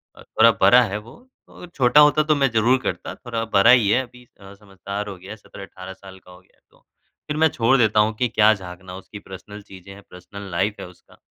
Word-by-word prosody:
अ, - - -16
थोड़ा 115 +1 +3
बड़ा 120 +6 +6
है, 105 -2 -4
वो 120 - -15 0.2
और 180 - -13
छोटा 130 +2 +3
होता 150 +1 +4
तो 155 0 +1
मैं 140 -2 +1
ज़रूर 115 +4 +2
करता, - - -5
थोड़ा 115 -2 -6
बड़ा 100 +5 +5
ही 115 -5 +4
है 130 - +2
अभी 125 0 -17 0.2
अ, 100 0 -13
समझदार 100 0 -8
हो 95 - -9
गया 95 +3 -13
है 110 - -9
17-18 95 -2 -12
साल 95 0 -15
का 90 - -19
हो 90 - -16
गया - - -34
है, - - -39
तो - - -27 0.5
फिर 150 0 -4
मैं 160 0 +3
छोड़ 120 +2 +1
देता 110 -3 +2
हूँ 110 +1 0
कि 125 - 0
क्या 110 0 +3
झाँकना, 90 -1 -11
उसकी 100 +2 -12
पर्सनल 100 +2 -12
चीज़ें 95 -1 -14
हैं, 100 0 -15
पर्सनल 100 +2 -11
लाइफ 100 +5 -1
है - - -8
उसका, 90 - -21
105 Hz, 240 wpm, -21 LUFS, 95-125 Hz, 0.5 s, बड़ा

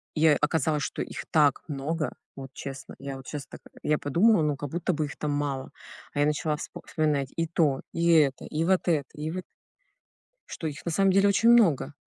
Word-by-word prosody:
и, 155 0 +2
э, 150 -2 +5
оказалось, 150 -1 +1
что - - -3
их - - -6
так 150 -4 +4
много. 150 +2 -3 0.2
Вот 135 -1 -7
честно. 135 -1 -8
Я 135 0 -6
вот 135 - -12
щас 145 -2 -5
так, - - -11
а - - -15
я 150 - +2
подумала, 175 +8 +3
ну 150 -1 +1
как 145 +1 -6
будто 175 +4 -1
бы 155 -1 -1
их 140 - -8
там 150 - -2
мало. 140 -2 -2 0.4
А 145 - -3
я - - +4
начала 150 +1 0
вспо - - -8
вспоминать 145 -4 0
и 165 - 0
то, 155 -5 +1
и 170 0 0
это, 150 -5 +3
и 155 +1 -2
вот 185 +1 +1
это, 150 -5 +1
и 150 +1 -4
вот 185 +2 -4 1.0
что 165 - -7
их 150 -3 -4
на 170 - -1
самом 195 +3 +3
деле 195 +1 +4
очень 205 +4 +4
много. 170 - +4
150 Hz, 220 wpm, -27 LUFS, 145-165 Hz, 1.0 s, э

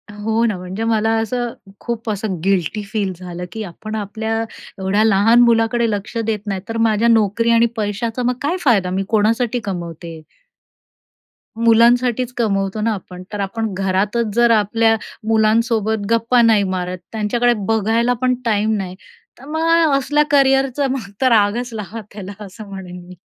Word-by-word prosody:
हो 220 +2 0
ना. 210 -5 0
म्हणजे 185 +4 -5
मला 225 -1 +1
असं 240 +1 -2 0.3
खूप 235 -1 -4
असं 200 -4 -3
गिल्टीफील 200 +2 -1
झालं, 180 -1 -7
की 220 -1 -5
आपण 215 +4 -7
आपल्या 220 +2 -3 0.4
एवढ्या 195 +3 +1
लहान 220 +2 +4
मुलाकडे 230 0 +3
लक्ष 205 +3 -4
देत 220 -2 -1
नाही 195 -2 -2
तर, 225 - -3
माझ्या 225 0 +2
नोकरी 230 0 +2
आणि 230 0 +5
पैशाचा 225 +3 -2
मग 250 +1 +1
काय 325 +6 0
फायदा, 200 -9 +3
मी 190 +1 -1
कोणासाठी 230 +3 +1
कमवते? 170 -4 -6 1.4
मुलांसाठीच 240 +2 +3
कमवतो 195 -2 0
ना 225 0 +1
आपण. 180 -2 -9
तर, 205 - -4
आपण 215 +1 -3
घरातच 200 +4 0
जर 235 0 +4
आपल्या 225 +1 +3 0.3
मुलांसोबत 220 -1 +1
गप्पा 230 +2 +3
नाही 225 -3 +4
मारत, 180 0 -3
त्यांच्याकडे 235 +3 +1
बघायला 225 +2 +2
पण 255 0 +2
टाईम 215 0 +1
नाही, 185 -2 -5 0.4
तर 270 - -13
मग 325 0 +2
असल्या 295 +2 +2
करियरचा 270 0 +3
मग 240 -7 -4
तर, 260 - +4
रागच 230 +3 +2
लावा 220 +1 -6
त्याला 205 +1 -8
असं 200 +2 -11
म्हणेन 180 -2 -8
मी. 180 -1 -12
220 Hz, 150 wpm, -19 LUFS, 200-235 Hz, 1.4 s, आणि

